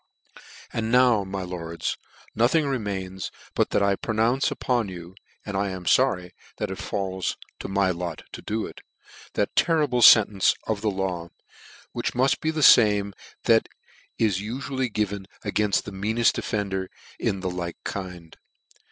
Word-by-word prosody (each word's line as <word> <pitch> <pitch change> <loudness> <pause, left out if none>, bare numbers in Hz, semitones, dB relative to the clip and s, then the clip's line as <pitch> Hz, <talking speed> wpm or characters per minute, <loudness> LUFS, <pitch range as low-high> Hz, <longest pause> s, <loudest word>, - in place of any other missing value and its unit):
" - - -18
And 115 0 -2
now, 125 -4 +5
my 95 0 -4
lords, 85 -2 -4 0.4
nothing 130 +8 +3
remains, 100 -8 -3 0.2
but - - +1
that 100 - +1
I 100 0 +3
pronounce 115 +6 +1
upon 120 -5 -1
you 90 -1 -9 0.3
(and 100 - -5
forry 95 -2 +2
I 90 - -11
am 90 - -15 0.3
that 105 -2 -3
it 95 - -6
falls 95 -2 -3 0.2
to - - -5
my 95 -1 +2
lot 85 -2 -5
to - - -8
do 110 +1 -2
it) - - -10 0.5
that - - -1
terrible 150 -7 +2
fentence 105 -4 +7
of 110 -2 -2
the 110 - +1
law, 95 -3 -3 0.6
which - - -3
muft 130 +2 +2
be 155 - -1
the 155 -1 -1
fame 105 -5 +6 0.3
that - - +3 0.5
is 100 -4 +1
ufually 130 +3 -3
given 100 -2 -2 0.2
againft 105 -2 +1
the - - -8
meaneft 110 +4 +1
offender 95 -3 -2 0.3
in 95 -1 -1
the 95 - -2
like 85 -1 -5
kind. 90 -4 -6
100 Hz, 155 wpm, -25 LUFS, 95-115 Hz, 0.6 s, fentence